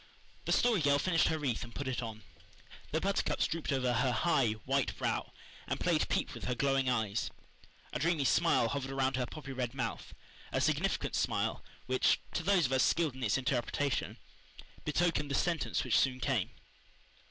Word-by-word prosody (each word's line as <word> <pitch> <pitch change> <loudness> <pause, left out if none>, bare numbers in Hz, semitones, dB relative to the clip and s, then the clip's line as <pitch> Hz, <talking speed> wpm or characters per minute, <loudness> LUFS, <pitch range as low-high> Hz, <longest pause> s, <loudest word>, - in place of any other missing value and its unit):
The - - -1
Story 235 -7 +3
Girl 140 -1 +4
finished 165 +3 +2
her 160 - 0
wreath 140 -7 -1
and 115 0 -10
put 140 - -4
it 130 -1 -1
on. 110 -2 -6 0.7
The 160 - +1
buttercups 195 +3 0
drooped 165 -1 -2
over 130 -2 +1
her 125 +2 +2
high, 135 -4 +2
white 135 0 0
brow - - -1 0.4
and - - -2
played - - +1
peep - - 0
with - - -7
her 125 - -1
glowing 135 0 +1
eyes. 110 -4 0 0.6
A - - -2
dreamy 160 0 +1
smile 130 -2 +3
hovered 135 0 -3
around 135 -1 0
her 125 -2 -1
poppy 145 -1 -8
red 125 -1 -3
mouth 120 -4 -4 0.4
a - - 0
significant - - 0
smile - - 0 0.2
which, 130 0 +3
to - - 0
those 180 -1 +3
of 130 - -1
us 130 -1 +3
skilled 165 -5 +2
in 130 - -10
its 110 -1 +2
interpretation, 135 +1 -1 0.7
betokened 150 -1 +1
the 140 - 0
sentence 170 +2 0
which - - +3
soon 130 -1 +1
came. 125 -6 0
135 Hz, 180 wpm, -32 LUFS, 125-155 Hz, 0.7 s, Girl